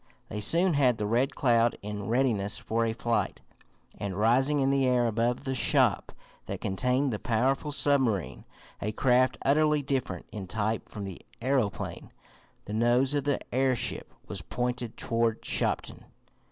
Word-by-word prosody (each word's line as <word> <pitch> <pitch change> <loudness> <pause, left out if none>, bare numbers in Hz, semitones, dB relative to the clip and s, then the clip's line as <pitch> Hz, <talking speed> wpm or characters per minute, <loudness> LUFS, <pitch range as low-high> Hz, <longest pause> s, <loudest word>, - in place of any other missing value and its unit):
They 105 - -4
soon 170 - +3
had 130 -5 +3
the 105 - -2
Red 120 +6 +1
Cloud 120 -2 +3
in 105 -1 -5
readiness 110 -4 +1
for 115 +1 -1
a 110 - -1
flight, 115 0 -1 0.5
and 100 -2 -5
rising 130 +7 +3
in 135 0 +2
the 135 -1 +2
air 125 -1 +3
above 120 +3 0
the 135 -2 -2
shop 130 - +2 0.4
that - - -4
contained 125 +6 0
the 105 - -3
powerful 130 +6 0
submarine, 135 - +1 0.4
a 105 +1 -2
craft 125 0 +3
utterly 150 +1 +3
different 130 -10 -2
in 100 -4 -6
type 110 +2 -2
from 105 - -7
the 95 -3 -7 0.2
aeroplane, 120 -8 -2 0.5
the 105 - -6
nose 120 +5 +2
of 145 -1 -1
the 145 -1 +1
airship 130 -2 0 0.2
was - - -5
pointed 125 -2 -3
toward 115 -1 -1
Shopton. - - -1
120 Hz, 155 wpm, -28 LUFS, 110-135 Hz, 0.5 s, soon